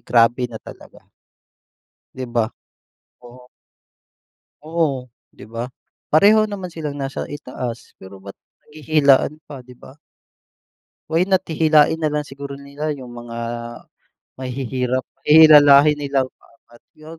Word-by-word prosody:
grabe 120 +1 +2
na 115 - -9
talaga. - - -14 1.1
'Di 130 - -5
ba? 120 -1 0 0.8
Oo. 125 +1 -15 1.2
Oo, 155 -6 -1 0.3
'di - - -13
ba? 120 +2 -4 0.4
Pareho 215 +7 +5
naman 190 -4 -7
silang 150 -3 -5
nasa 135 -1 -4
itaas, 125 -5 -7
pero 95 +1 -12
ba't 100 0 -9 0.3
naghihilaan 150 -1 +2
pa, 140 -3 -10
'di 125 0 -16
ba? 130 - -16 1.1
Why 165 +2 +2
not 190 0 0
hihilain 155 0 +3
na 155 - +1
lang 150 0 -3
siguro 140 0 -9
nila 140 +2 -5
yung 130 -4 -9
mga 120 -1 -9 1.0
mahihirap, 130 0 -3 0.2
hihilahin 150 -1 +7
nilang 135 -2 -1
paangat 120 +1 -23
yung 155 +1 -13
140 Hz, 120 wpm, -20 LUFS, 125-155 Hz, 1.2 s, hihilahin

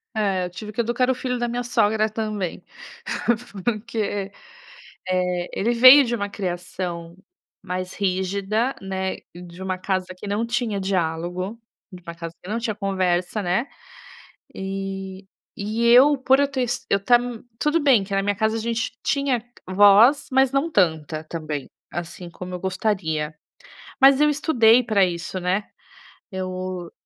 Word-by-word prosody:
É, 195 -4 0
eu - - -5
tive 210 +3 -8
que 235 - -1
educar 240 +2 0
o 260 - +2
filho 250 -1 -3
da 240 - 0
minha 245 +1 -3
sogra 215 -2 +2
também. 215 -4 -4 1.0
Porque, 210 -3 -2 0.8
eh, 180 -1 0
ele 230 +5 0
veio 255 +4 +9
de 240 - -2
uma 205 -2 -3
criação 175 -3 -5 0.5
mais 185 -1 -4
rígida, 200 +5 -1
né, 190 -1 -3 0.2
de 175 +1 -10
uma 185 -1 -2
casa 185 -1 -1
que 185 - -9
não 205 +3 -1
tinha 230 -4 -1
diálogo, 180 +2 -2 0.4
de 180 - -11
uma 170 -1 -9
casa 165 -1 -7
que 185 - -9
não 225 - -1
tinha 225 -2 -2
conversa, 190 -1 -1
né. 190 +9 0 0.9
E 195 0 -5 0.3
e 215 +3 -2
eu 260 +5 +7
por 265 +1 +3
eu 285 - +3
ter 270 -2 -3
es 245 +2 -3
eu 200 - +4
estar 240 +5 +4 0.4
tudo 300 +2 +2
bem 260 -8 +4
que 195 - -7
na 195 - +2
minha 205 0 0
casa 220 +2 0
a - - -2
gente 230 0 -2
tinha 275 -5 0 0.3
voz, 205 +8 +6
mas 265 0 +4
não 285 +5 +1
tanta 160 - 0
também, 155 -4 -5 0.2
assim 175 +1 -6
como 180 +1 -8
eu - - -6
gostaria. 180 -5 -2 0.7
Mas 270 +1 +7
eu 300 - +5
estudei 250 -5 +4
pra 210 -4 +3
isso, 175 +1 -4
né. 185 +3 -1 0.6
Eu 185 -2 -5
200 Hz, 155 wpm, -23 LUFS, 180-235 Hz, 1.0 s, veio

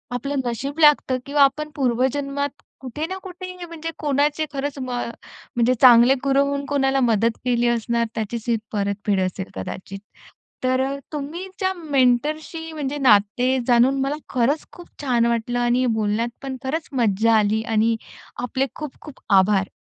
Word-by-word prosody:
आपलं 275 +4 -3
नशीब 275 +6 -4
लागतं 295 -4 +5
किंवा 285 0 +4
आपण 300 +3 +1
पूर्वजन्मात 275 +2 -1 0.2
कुठे 265 +4 -5
ना 375 +2 -5
कुठे 365 -1 -8
म्हणजे 330 -1 -6
कोणाचे 295 +1 +1
खरंच 285 +1 -3
म 255 -1 -5 0.7
म्हणजे 240 +1 +3
चांगले 245 0 +8
गुरु 275 0 +3
होऊन 280 0 -2
कोणाला 270 -1 +2
मदत 230 -1 +2
केली 240 -1 +2
असणार 235 0 0
त्याचीच 225 0 -3
ही 235 - +3 0.2
परतफेड 200 -1 -1
असेल 185 +1 -2
कदाचित. 185 - -6 0.6
तर 255 0 +2 0.3
तुमचे 365 +6 -3
मेंटरशी 305 +2 0
म्हणजे 290 -2 -3
नाते 245 +1 +3
जाणून 255 +3 +4
मला 275 +2 0
खरंच 260 +5 +1
खूप 350 - -13
छान 245 -4 +2
वाटलं 235 +1 0
आणि 245 +1 +2
बोलण्यात 220 +2 0
पण 270 -1 -5
खरंच 310 +5 -3
मज्जा 230 -2 +2
आली 215 +1 +2
आणि 225 +1 +2 0.5
आपले 260 +2 0
खूप 300 -4 -7
खूप 300 -3 -12 0.2
आभार. 195 0 +2
260 Hz, 145 wpm, -22 LUFS, 230-290 Hz, 0.7 s, चांगले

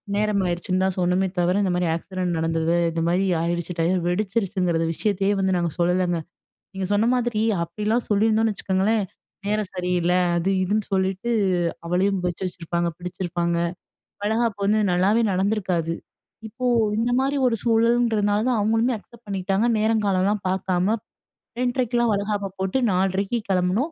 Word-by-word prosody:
நேரமாயிடுச்சுன்னு 185 -3 0
தான் 190 - -1
சொன்னோமே 180 +2 +2
தவிர, 175 +1 +2
இந்த 185 - +1
மாரி 180 -1 0
ஆக்சிடென்ட் 180 0 -3
நடந்தது, 165 +1 0 0.2
இந்த 165 0 -2
மாரி 180 +3 +2 0.2
ஆடிடுச்சு 170 +1 -2
டயர். 180 +3 +2
வெடிச்சிருச்சுங்கிறது 185 -4 0
விஷயத்தையே 200 +1 0
வந்து 190 -1 +1
நாங்க 170 -1 0
சொல்லலைங்க. 175 0 +1 0.5
நீங்க 190 -1 -3
சொன்ன 215 +3 +2
மாதிரி 240 -3 0 0.2
அப்படிலாம் 210 +7 -1
சொல்லியிருந்தோம்ன்னு 220 +1 +2
வச்சுக்கங்களேன், 200 +3 +1 0.4
நேரம் 210 -2 -1
சரியில்ல, 180 -1 0 0.2
அது 175 +3 0
இதுன்னு 210 +2 0
சொல்லிட்டு 190 +4 0 0.6
அவளையும் 185 +2 +1
வச்சு 175 +2 -4
வச்சிருப்பாங்க. 170 0 -2
பிடிச்சிருப்பாங்க. 175 -1 -2 0.7
வளைகாப்பு 220 -1 0
வந்து 215 +2 +3
நல்லாவே 200 +6 +3
நடந்துருக்காது. 185 -4 0 0.5
இப்போ 250 +4 -7 0.3
இந்த 240 +2 +1
மாரி 275 +2 0
ஒரு 235 - +2
சூழல்ன்றதுனால 225 -2 +2
தான் 245 - +2
அவங்களுமே 225 +4 +2
அக்செப்ட் 235 +2 -17
பண்ணிகிட்டாங்க. 195 +2 0
நேரங்காலம்லாம் 210 -2 +1
பார்க்காம 190 +3 0 0.6
2:30 245 -2 +1
வளைகாப்ப 200 -1 -2
போட்டு 190 +7 0
4:30க்கு 195 +4 0
கெளம்புனோம். 190 - +1
195 Hz, 130 wpm, -23 LUFS, 180-215 Hz, 0.7 s, வந்து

